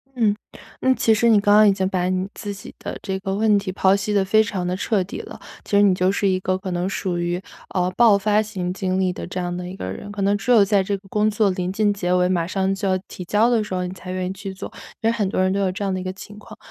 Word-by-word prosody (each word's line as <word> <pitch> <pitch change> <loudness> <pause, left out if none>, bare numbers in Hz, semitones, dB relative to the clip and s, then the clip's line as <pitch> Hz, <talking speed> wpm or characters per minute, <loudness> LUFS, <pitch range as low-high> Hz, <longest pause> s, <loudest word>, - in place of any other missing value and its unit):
嗯， 215 -4 +2 0.5
嗯， 260 0 +3
其 225 - +2
实 220 +2 +2
你 220 -3 +6
刚 205 0 +4
刚 215 0 +7
已 200 - +6
经 190 -1 0
把 180 -1 0
你 185 0 -1
自 205 -2 -5
己 200 - -11
的 - - -6
这 190 -1 -3
个 195 0 -3
问 210 -1 +3
题 195 -2 -3
剖 190 +1 +3
析 205 +1 -2
得 200 -1 +3
非 215 +3 +4
常 190 -4 -3
得 180 - -1
彻 200 +1 0
底 180 - -7
了。 - - -11 0.3
其 - - -12
实 200 - +6
你 195 -3 +4
就 185 +1 +2
是 200 0 0
一 185 -1 +1
个 185 0 0
可 190 -1 -6
能 175 +1 -1
属 185 -2 -2
于， 175 +1 -2 0.3
呃， 180 -1 +1
爆 230 -4 +6
发 210 +1 +2
型 190 -4 -4
经 185 0 -1
历 185 -1 +1
的 - - -6
这 180 - -5
样 175 -1 -3
的 180 0 -5
一 185 - -7
个 95 - -5
人， 205 - -8
可 205 -1 -5
能 200 +1 +2
只 250 - -1
有 225 -4 +7
在 200 -1 +2
这 200 +1 -1
个 195 0 -19
工 210 0 +1
作 210 -1 +2
临 185 0 -3
近 210 0 +2
结 180 -3 -1
尾 180 0 +3
马 175 -3 +1
上 190 +1 0
就 195 0 -3
要 185 - +2
提 180 - -8
交 215 +6 +3
的 230 -3 +2
时 210 -3 -7
候， 180 0 -1
你 - - -6
才 185 0 -8
愿 185 0 -2
意 185 - -3
去 195 0 -7
做， 190 - -8 0.3
因 220 - +1
为 - - +3
很 215 -4 0
多 190 - 0
人 185 0 +2
都 200 - 0
有 190 -1 +1
这 205 +2 -5
样 195 - 0
的 185 - -2
一 - - -5
个 185 0 -4
情 205 +2 -11
况。 215 +1 -13
195 Hz, 335 characters per minute, -22 LUFS, 185-205 Hz, 0.5 s, 刚